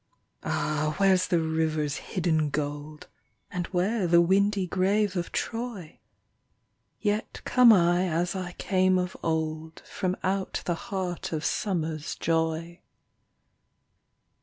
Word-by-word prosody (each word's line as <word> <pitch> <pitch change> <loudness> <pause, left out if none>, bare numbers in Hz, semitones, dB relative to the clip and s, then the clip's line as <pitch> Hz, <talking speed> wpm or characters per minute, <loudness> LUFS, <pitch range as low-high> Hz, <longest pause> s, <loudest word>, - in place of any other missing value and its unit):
Ah, 155 0 -1
where's 190 -2 +4
the 175 - +2
river's 160 -2 0
hidden 160 -4 0
Gold! 145 +1 -4 0.4
And 175 -1 -3
where 190 +2 0
the 170 0 +5
windy 195 +3 +3
grave 195 +3 +1
of 175 -2 -3
Troy? 225 -8 -4 1.0
Yet 210 0 -2
come 250 -2 +7
I 175 -2 +4
as 170 +3 -1
I 180 -1 -4
came 185 0 +2
of 180 0 -2
old, 160 0 -3
From 185 0 -2
out 190 0 -1
the 175 - +1 0.2
heart 185 -3 -3
of 160 -1 -3
Summer's 160 -6 -2
joy. 165 +1 -1
175 Hz, 115 wpm, -27 LUFS, 160-190 Hz, 1.0 s, come